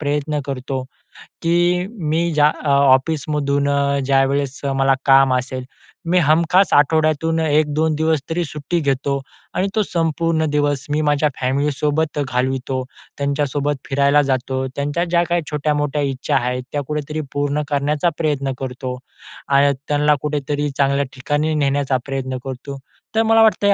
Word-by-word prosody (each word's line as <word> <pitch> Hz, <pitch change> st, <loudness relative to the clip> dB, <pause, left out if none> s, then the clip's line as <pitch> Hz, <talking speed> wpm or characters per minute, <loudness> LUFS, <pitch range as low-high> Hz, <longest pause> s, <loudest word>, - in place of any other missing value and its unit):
प्रयत्न 150 Hz, 0 st, -1 dB
करतो, 135 Hz, -1 st, -3 dB, 0.6 s
की 175 Hz, +2 st, +2 dB, 0.2 s
मी 170 Hz, +2 st, +1 dB
ज्या 150 Hz, -1 st, +5 dB, 0.2 s
अ, 150 Hz, -, -1 dB
ऑफिसमधून 140 Hz, +1 st, +2 dB
अ, 140 Hz, 0 st, +1 dB
ज्यावेळेस 135 Hz, 0 st, +1 dB, 0.2 s
मला 135 Hz, 0 st, +3 dB
काम 135 Hz, -1 st, +5 dB
असेल, 130 Hz, 0 st, -3 dB, 0.5 s
मी 180 Hz, -, +3 dB
हमखास 170 Hz, +4 st, +3 dB
आठवड्यातून 155 Hz, +2 st, +2 dB
1-2 155 Hz, 0 st, +1 dB
दिवस 160 Hz, 0 st, +1 dB
तरी 170 Hz, +2 st, 0 dB
सुट्टी 150 Hz, +3 st, -3 dB
घेतो 140 Hz, -1 st, 0 dB, 0.3 s
आणि 190 Hz, -, 0 dB
तो 215 Hz, -, +3 dB
संपूर्ण 165 Hz, -2 st, 0 dB
दिवस 145 Hz, -2 st, 0 dB
मी 150 Hz, +1 st, +1 dB
माझ्या 150 Hz, 0 st, +2 dB
फॅमिलीसोबत 145 Hz, +3 st, 0 dB
घालवितो. 130 Hz, +1 st, -1 dB, 0.3 s
त्यांच्यासोबत 145 Hz, 0 st, -1 dB
फिरायला 140 Hz, +1 st, +3 dB
जातो. 130 Hz, -1 st, -1 dB
त्यांच्या 145 Hz, +4 st, -1 dB
ज्या 170 Hz, 0 st, +2 dB
काही 175 Hz, 0 st, +1 dB
छोट्या-मोठ्या 150 Hz, -1 st, 0 dB
इच्छा 135 Hz, -2 st, -1 dB
आहेत, 125 Hz, 0 st, -2 dB
त्या 145 Hz, -, -1 dB
कुठे 150 Hz, 0 st, -2 dB
तरी 155 Hz, +1 st, -2 dB
पूर्ण 145 Hz, +1 st, 0 dB
करण्याचा 145 Hz, +3 st, +1 dB
प्रयत्न 145 Hz, -4 st, -1 dB
करतो. 130 Hz, -1 st, -5 dB, 0.5 s
आणि 140 Hz, 0 st, +4 dB
त्यांना 150 Hz, 0 st, +3 dB
कुठेतरी 145 Hz, 0 st, -2 dB
चांगल्या 140 Hz, 0 st, +2 dB
ठिकाणी 145 Hz, +4 st, -1 dB
नेण्याचा 140 Hz, -2 st, +1 dB
प्रयत्न 130 Hz, -1 st, -3 dB
करतो. 135 Hz, +1 st, -6 dB, 0.4 s
तर 225 Hz, -, +4 dB
मला 225 Hz, 0 st, +4 dB
वाटतं, 210 Hz, -2 st, +4 dB
145 Hz, 140 wpm, -19 LUFS, 135-155 Hz, 0.6 s, ज्या